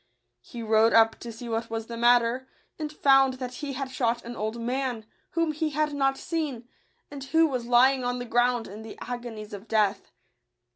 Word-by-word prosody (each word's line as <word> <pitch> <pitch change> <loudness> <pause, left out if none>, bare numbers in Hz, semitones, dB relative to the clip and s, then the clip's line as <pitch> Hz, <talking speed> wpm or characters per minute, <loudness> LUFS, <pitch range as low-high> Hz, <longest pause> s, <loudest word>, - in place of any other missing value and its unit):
He 235 -2 -8
rode 220 +1 +4
up 225 0 +5
to 235 - -7
see 230 +2 -9
what 225 0 -2
was 225 -1 -4
the 235 - -7
matter, 240 +2 +3 0.3
and 305 -1 -3
found 270 -3 +4
that 255 -1 -6
he 285 -2 -4
had 265 0 -4
shot 235 -2 -1
an 240 +1 -6
old 220 +2 -3
man, 245 -1 -2 0.3
whom 330 -1 +1
he 310 +1 -1
had 300 0 -1
not 270 -1 +1
seen, 290 -8 -3 0.4
and 280 -2 -7
who 325 +4 +4
was 255 -6 -2
lying 255 +2 +4
on 245 0 -1
the 245 - -5
ground 240 0 +1
in 205 +3 -9
the 220 -1 -10
agonies 235 -4 -7
of 205 +2 -8
death. 210 -2 +1
245 Hz, 195 wpm, -27 LUFS, 230-270 Hz, 0.4 s, up